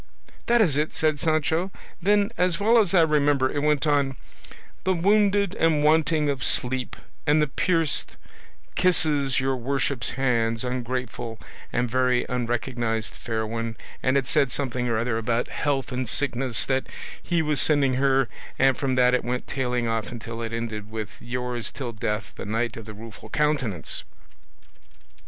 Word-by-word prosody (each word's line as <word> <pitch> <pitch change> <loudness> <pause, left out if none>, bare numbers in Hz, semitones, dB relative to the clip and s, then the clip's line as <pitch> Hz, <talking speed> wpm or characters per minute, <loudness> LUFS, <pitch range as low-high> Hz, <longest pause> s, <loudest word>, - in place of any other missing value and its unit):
'" - - -27
"That 235 0 +5
is 155 -9 +3
it," 150 +1 0
said 155 -2 +1
Sancho; 160 +3 +1 0.3
"then, 205 +3 +3
as 180 -2 +1
well 225 +3 +5
as 195 -3 +2
I 170 - +7
remember, 145 -4 +2
it 145 - -1
went 150 0 +2
on, 140 -3 +2 0.7
'The 190 - +2
wounded, 200 +1 +3
and 160 -5 +2
wanting 155 0 +3
of 140 -2 -1
sleep, 125 0 -1 0.3
and 150 +1 +5
the 150 - +4
pierced, 165 +2 0 0.6
kisses 150 -7 +2
your 135 0 0
worship's 130 -1 -1
hands, 115 -3 +1
ungrateful 125 -2 -4 0.3
and 120 +1 0
very 125 +1 +2
unrecognised 120 -2 -1
fair 110 -1 -3
one; 115 0 -4 0.2
and 130 +2 +2
it 135 - +1
said 140 -4 +2
something 125 -3 -2
or 115 - +1
other 115 0 0
about 115 +1 -1
health 140 -3 -1
and 125 -2 -2
sickness 125 -3 -1
that 130 -1 0 0.3
he 170 -2 0
was 150 -2 +2
sending 145 -4 +3
her; 135 0 +3 0.3
and 135 -1 +4
from 135 -2 0
that 125 0 +4
it 125 - +2
went 125 +1 -2
tailing 125 -3 -1
off 115 0 -2
until 115 -1 -6
it 115 -1 -4
ended 110 -2 -4
with 110 -2 -5
'Yours 125 -2 -3
till 125 -4 -5
death, 105 0 -3
the - - -6
Knight 115 +3 -1
of 115 - -8
the 110 0 -9
Rueful 110 -1 -11
Countenance." 135 - 0
130 Hz, 165 wpm, -25 LUFS, 120-150 Hz, 0.7 s, I